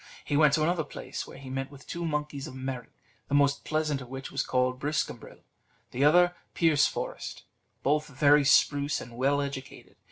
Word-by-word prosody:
He 145 - -1
went 150 -1 +5
to 155 - +3
another 170 0 +1
place, - - -7
where - - -11
he 135 -1 -9
met 135 0 -3
with 140 0 -14
two 170 - -5
monkeys 150 -2 -3
of 130 - -9
merit, 130 -2 -5 0.4
the 145 - 0
most 140 -1 +3
pleasant 155 -3 -1
of 125 - -10
which 135 +1 -7
was - - 0
called 130 0 0
Briscambril, 150 +1 -3 0.5
the 130 - 0
other 175 +4 +5 0.2
Pierceforest 160 -4 0 0.4
both 150 +2 +1
very 145 +1 +4
spruce 145 +1 +3
and 120 0 -10
well 140 +3 +2
educated. 135 -1 -8
145 Hz, 180 wpm, -28 LUFS, 135-150 Hz, 0.5 s, went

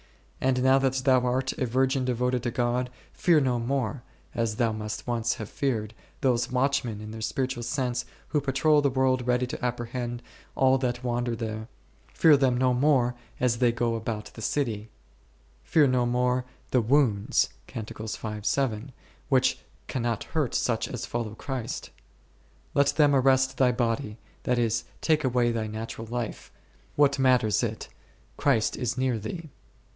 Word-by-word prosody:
And 130 -1 +2
now 130 +1 +5
that 135 -1 +1
thou 130 0 +4
art 130 +2 0
a 130 - 0
virgin 130 +2 +1
devoted 125 0 0
to 120 - -1
God, 125 0 0 0.2
fear 170 -3 +4
no 125 -4 +1
more 125 0 -1 0.3
(as 115 -2 -1
thou 115 0 +1
must 110 -1 -5
once 120 -1 0
have 110 - -6
feared) 110 -6 -2 0.3
those 120 -2 +1
watchmen 125 -4 0
(in 110 0 -8
their 110 0 -7
spiritual 130 +1 -2
sense) 125 0 -1 0.2
who 150 - +1
patrol 145 +2 +3
the 140 - +2
world 130 -1 +1
ready 125 0 +2
to 125 - -7
apprehend 120 0 -3 0.3
all 130 0 +4
that 125 -1 -2
wander 120 -1 -1
there; 110 -1 -4 0.5
fear 160 -2 +7
them 130 -3 +2
no 130 0 +3
more 125 -2 +3 0.3
as 120 -2 +1
they 120 -2 +4
go 120 0 0
about 110 -1 -4
the 115 - -10
city; 110 -4 -1 0.7
fear 150 - +4
no 125 -2 +2
more 125 +1 +1 0.3
the 125 - +4
wounds 115 -4 +2 0.2
1 110 - -5 1.4
which - - +3 0.3
can 130 - -3
not 115 -2 -1
hurt 150 -7 -1
such 115 -2 0
as 125 - -5
follow 115 -3 -4
Christ. 125 -1 -5 0.8
Let 140 -1 +4
them 145 -1 +4
arrest 130 0 +3
thy 130 -2 +5
body, 115 -2 -1 0.3
that 125 - +1
is, 115 -1 +1 0.2
take 155 -1 +2
away 125 -2 +2
thy 115 -2 -2
natural 110 +1 -6
life, 120 -1 -5 0.4
what 140 -1 +3
matters 125 -6 +3
it, - - -3 0.5
Christ 125 -7 +2
is 120 0 -2
near 130 -3 +1
thee. 155 - -6
125 Hz, 160 wpm, -27 LUFS, 115-130 Hz, 1.4 s, fear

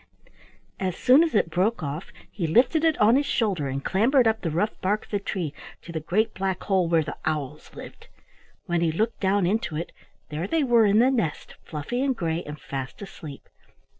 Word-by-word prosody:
As 185 -3 -2
soon 260 +4 +6
as 325 -7 -1
it 170 -5 +2
broke 185 +3 0
off, 150 +5 -5 0.2
he 175 -6 -2
lifted 250 - +3
it 320 -2 +3
on 215 +3 +5
his 285 +2 +2
shoulder 190 - 0
and 135 +1 -4
clambered 240 +6 +3
up 220 0 +1
the 165 - -1
rough 175 +8 -1
bark 205 +3 0
of - - -26
the 205 - 0
tree 180 -6 -3 0.3
to - - -9
the 160 - -3
great 215 +8 0
black 190 -1 -2
hole 190 -4 +2
where 165 -1 +3
the 150 - -6
owls 150 -4 -3
lived. - - -11 0.6
When 175 -1 0
he 165 -2 +2
looked 220 +8 -1
down 195 -1 +2
into 180 -4 -1
it, 165 +3 -4 0.4
there 155 +4 -3
they 320 +7 +1
were 235 -4 +4
in 205 +1 +4
the 250 +4 +5
nest, 215 - -2
fluffy 160 - -4
and 270 -1 +1
gray, 165 -1 -1
and 150 +1 -8
fast 135 -1 -6
asleep. 155 -7 -10
190 Hz, 205 wpm, -25 LUFS, 160-225 Hz, 0.6 s, soon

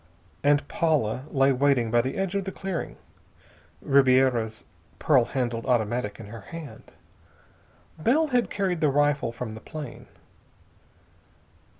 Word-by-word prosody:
And 145 0 +3
Paula 150 - 0
lay 135 -1 +3
waiting 130 -3 +2
by 120 0 +4
the 130 +3 -4
edge 195 -2 -1
of 200 -1 -1
the 190 - -4
clearing, 190 -3 -5 0.9
Ribiera's 130 -5 +3 0.3
pearl 130 -6 +3
handled 120 -2 -3
automatic 120 -2 0
in 115 - -8
her 110 +2 -9
hand 160 +8 -10 1.1
Bell 295 - +2
had 245 -2 +1
carried 185 -4 -1
the 150 - +4
rifle 145 -3 +1
from 115 -1 -6
the 110 - -8
plane. 150 -6 -8
135 Hz, 125 wpm, -26 LUFS, 120-160 Hz, 1.1 s, by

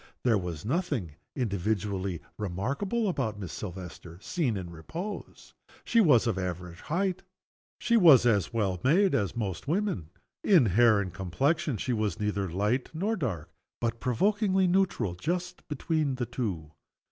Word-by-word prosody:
There 120 -3 +4
was 90 -4 -3
nothing 140 - -1 0.2
individually 100 - -1 0.2
remarkable 140 - -1
about 125 - -1
Miss 90 -7 -6
Silvester, 90 -3 -8
seen 130 - -1
in - - -3
a - - -6
state - - -8
of - - -11
repose. 170 - -7 0.3
She 230 - +4
was 135 - +5
of 115 -5 0
the - - -1
average 90 -1 -5
height. 185 +3 -1 0.6
She 235 -1 +2
was 155 - +7
as 105 -6 +2
well 100 -6 0
made 180 +7 +4
as 105 -7 0
most 100 -2 -3
women. 165 - -1 0.3
In 180 - +6
hair 110 +2 +5
and 95 -3 -3
complexion 135 - 0
she 125 - -1
was 105 -5 -1
neither 100 -2 -1
light 105 +9 0
nor 205 +7 0
dark, 110 - -3 0.3
but 115 0 -1
provokingly 195 - +2
neutral 180 - +1
just 180 - -3
between 150 -1 -1
the 125 -1 -2
two. 100 - -4
115 Hz, 160 wpm, -29 LUFS, -, 0.6 s, was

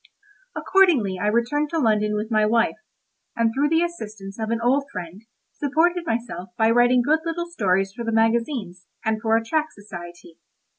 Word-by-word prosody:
Accordingly 280 - +3
I 205 - 0
returned 240 +7 +1
to 330 - -2
London 215 -6 +1
with 215 +2 -3
my 215 -1 +3
wife, 230 +2 +2 0.6
and 230 -1 +1
through 285 +4 +1
the 325 +1 +3
assistance 215 -12 -7
of 220 0 -2
an 230 0 0
old 265 +4 +2
friend 180 +3 -8 0.3
supported 335 +4 0
myself 225 -6 -3
by 225 0 +3
writing 245 +1 +4
good 305 +5 +2
little 335 +1 -3
stories 195 - 0
for 235 +2 -6
the 230 - -2
magazines, 225 - 0 0.2
and 220 -1 0
for 225 0 +3
a 225 - -3
tract 310 +5 -1
society. 175 -4 -11
225 Hz, 170 wpm, -23 LUFS, 210-285 Hz, 0.6 s, writing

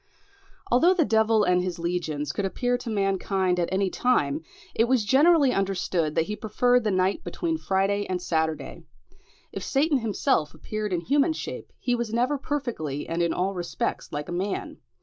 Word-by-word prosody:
Although 335 +10 +5
the 330 -5 +3
devil 220 -2 +3
and 180 -2 +3
his 180 -1 -3
legions 160 -4 -2
could 195 +5 -3
appear 245 +6 0
to 245 -1 -5
mankind 195 -3 0
at 170 - 0
any 190 0 +1
time, 150 - +1 0.3
it 225 - +3
was 240 -3 +2
generally 285 +3 +5
understood 180 -5 -1
that 165 - +3
he 210 - -4
preferred 245 +3 +2
the 215 - +1
night 185 0 +1
between 335 -2 -2
Friday 200 -1 0
and 185 -1 -1
Saturday. 160 -3 -2 0.7
If - - -5
Satan 285 0 +2
himself 215 - 0
appeared 215 +6 -4
in 175 -2 0
human 285 - +2
shape, - - -7
he 245 - -1
was 235 -2 -2
never 250 +5 +1
perfectly 240 - -3
and 165 +1 -1
in 170 - +2
all 190 +2 -1
respects 175 -2 -3
like 145 0 -4
a - - -6
man. 190 +3 -3
200 Hz, 175 wpm, -26 LUFS, 175-245 Hz, 0.7 s, Although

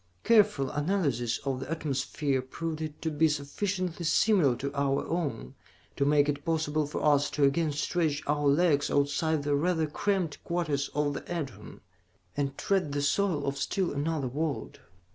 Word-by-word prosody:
"Careful 210 - +4
analysis 145 - 0
of 135 -2 -1
the 135 - -7
atmosphere 140 -3 -1
proved 160 +4 -5
it 155 -1 -5
to 160 - -1
be 155 +2 +3
sufficiently 175 +5 -2
similar 165 - +3
to 140 +3 -4
our 140 -1 0
own 145 - -3 0.4
to 140 - +1
make 145 0 +4
it 145 -1 -2
possible 155 -2 0
for 150 - -3
us 145 -1 +4
to 150 - -1
again 150 +3 +3
stretch 155 0 -1
our 145 0 +1
legs 145 0 +3
outside 145 +2 +1
the 145 0 0
rather 160 +2 +1
cramped 180 0 -1
quarters 155 -5 -1
of 145 -1 +1
the 140 - -4
Edorn, 135 - -6 0.5
and 140 -1 -2
tread 190 -7 0
the 145 - 0
soil 155 -1 +1
of 140 0 -2
still 185 +3 -1
another 145 -1 -1
world. 145 +3 -3
150 Hz, 160 wpm, -29 LUFS, 140-165 Hz, 0.5 s, Careful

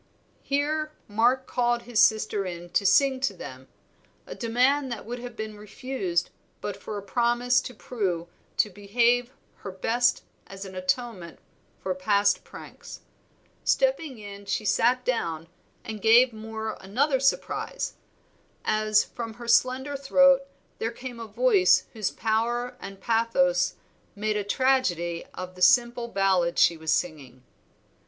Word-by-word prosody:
Here 305 +2 -1
Mark 240 +5 +2
called 240 -1 0
his 235 -3 -1
sister 215 -2 +3
in 175 -1 -7
to 200 - +2
sing 270 +2 +4
to 255 -7 -1
them, 130 -5 -10 0.6
a - - -7
demand 255 +4 +1
that 235 - -5
would 240 +2 -5
have 245 -1 -8
been 220 -1 -6
refused 205 -4 -3 0.3
but 205 - -4
for 205 +1 -7
a 200 - -6
promise 240 +4 +2
to 250 - -8
Prue 190 -8 -3 0.3
to 210 - +2
behave 235 +5 +1 0.3
her - - -8
best 240 +6 +1 0.2
as 195 0 -8
an 190 - -9
atonement 185 -1 -3 0.5
for 190 - -1
past 200 +2 +2
pranks. - - -11 0.6
Stepping 330 - +1
in 200 -1 -10
she 215 - -1
sat 250 +4 +2
down 165 -10 -2 0.4
and 215 -2 -6
gave 235 +3 +6
Moor 220 0 -5
another 265 +8 +1
surprise, 275 +1 -1 0.7
as 215 0 +3
from 230 -2 -7
her 240 0 -10
slender 255 +4 +2
throat 275 0 +4 0.3
there 225 - -1
came 245 0 -8
a 230 - -6
voice 435 - +4
whose 215 -4 -1
power 235 +3 -1
and 195 0 -9
pathos 180 -6 +2 0.4
made 215 +1 -1
a 210 - -1
tragedy 200 -8 +1
of 185 0 -6
the 180 - -14
simple 240 +4 +4
ballad 190 -5 +1
she 170 - +5
was 160 -1 -3
singing. 145 -7 -2
225 Hz, 140 wpm, -26 LUFS, 195-250 Hz, 0.7 s, gave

